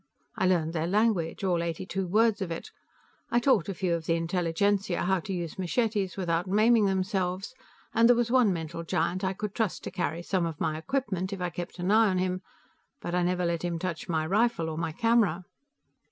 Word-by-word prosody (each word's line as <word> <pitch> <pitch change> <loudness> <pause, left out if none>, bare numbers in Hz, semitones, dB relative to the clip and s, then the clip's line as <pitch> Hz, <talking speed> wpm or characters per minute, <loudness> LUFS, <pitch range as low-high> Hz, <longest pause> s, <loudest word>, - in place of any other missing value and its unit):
I - - +1
learned 165 -3 +1
their 165 0 -1
language, 200 -3 +1
all 180 -3 +1
eighty 170 +1 -3
two 190 0 -3
words 215 +3 +3
of 190 - -2
it. 165 - -6 0.6
I 240 - +3
taught 240 - +2
a - - -1
few 180 -1 0
of 165 -1 -3
the 165 - +3
intelligentsia 175 +3 0
how 190 +1 +2
to 185 - -7
use 175 -2 -4
machetes 200 0 0
without 175 -1 0
maiming 215 +2 +4
themselves, 190 +1 -1 0.4
and 230 +1 +5
there 245 - +7
was 235 0 0
one 250 -5 +5
mental 165 -1 -4
giant 175 +2 -1
I 190 0 0
could 205 +1 -5
trust 220 -3 -1
to - - -5
carry 170 -1 -2
some 180 -2 0
of 160 -3 -6
my 155 -1 0
equipment, 190 - -2
if 195 - -5
I 180 -1 -2
kept 175 +2 -6
an 180 +2 -1
eye 220 0 +5
on 185 - 0
him, 185 0 -1 0.6
but 175 - -5
I 180 - +2
never 180 0 0
let 170 -1 -1
him 175 -1 -1
touch 170 -1 -4
my 160 -2 0
rifle 195 -2 +1
or 155 - -5
my 165 -1 -2
camera." 205 -3 +2
185 Hz, 210 wpm, -28 LUFS, 170-205 Hz, 0.6 s, there